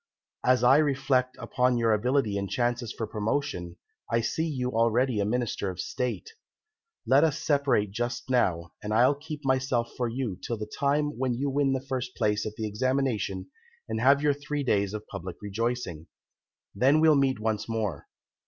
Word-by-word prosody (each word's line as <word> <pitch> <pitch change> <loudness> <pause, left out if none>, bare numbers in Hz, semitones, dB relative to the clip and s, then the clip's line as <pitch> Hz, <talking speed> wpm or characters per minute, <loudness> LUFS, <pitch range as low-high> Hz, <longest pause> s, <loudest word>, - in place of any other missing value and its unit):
As 125 -1 +3
I 130 +3 +7
reflect 130 -3 +1
upon 125 -1 +1
your 115 -2 +3
ability 115 0 +1
and 100 -1 -2
chances 120 -1 -1
for 115 - -4
promotion, 105 -5 -2 0.4
I 115 - +3
see 160 +8 -1
you 125 -5 -2
already 115 +1 +2
a 100 - +1
Minister 110 -3 -1
of 90 -1 -7
State. 125 - -3 0.7
Let 135 +3 +5
us 155 -2 +2
separate 140 -10 +1
just 120 +4 -3
now, 85 -10 +1
and 105 +1 -2
I'll 125 +5 +5
keep 150 0 -8
myself 130 -3 0
for 120 -2 -1
you 115 -6 -3
till 115 - -3
the 105 - -4
time 145 +5 -1
when 130 -2 0
you 140 +3 -1
win 140 -1 +2
the 130 0 -3
first 130 -1 -3
place 105 -2 0
at 105 - -6
the 110 - -3
Examination 125 - -1 0.4
and 110 - -2
have 140 +3 +5
your 145 -1 +4
three 145 +1 -4
days 100 -4 +1
of 105 0 -6
public 90 +1 -7
rejoicing. 105 -5 -3 0.7
Then 135 +9 +4
we'll 160 0 +6
meet 135 -4 +2
once 110 0 -2
more. 110 -4 -2
125 Hz, 175 wpm, -27 LUFS, 105-135 Hz, 0.7 s, I